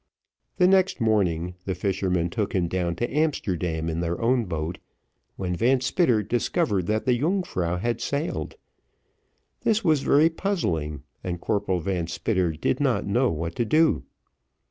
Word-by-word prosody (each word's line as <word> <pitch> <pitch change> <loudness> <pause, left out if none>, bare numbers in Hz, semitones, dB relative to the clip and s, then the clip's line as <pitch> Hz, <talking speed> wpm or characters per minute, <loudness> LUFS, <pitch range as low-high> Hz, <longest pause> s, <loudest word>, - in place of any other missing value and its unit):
The 180 - +5
next 190 -3 +3
morning, 90 -7 +1
the 95 - -2
fishermen 90 -3 0
took 105 +1 -2
him 90 -2 +1
down 85 -1 -1
to 120 - -3
Amsterdam 90 - 0
in 80 0 -2
their 85 0 -2
own 120 0 +2
boat, 80 -1 -4 0.6
when 90 -2 -2
Van 125 +7 +3
Spitter 130 - +2
discovered 115 - 0
that 110 +1 0
the 125 - +3
Yungfrau 125 - 0
had 120 +4 -2
sailed; 145 +4 -2 1.1
this 220 0 +1
was 155 -6 +3
very 155 +5 +4
puzzling, 80 - -2 0.2
and 90 -1 -3
Corporal 95 -3 -1
Van 90 -2 -2
Spitter 90 0 0
did 75 - -1
not - - +1
know - - +2
what 85 +1 -3
to 120 - +2
do. 155 +7 +3
100 Hz, 150 wpm, -25 LUFS, 85-135 Hz, 1.1 s, The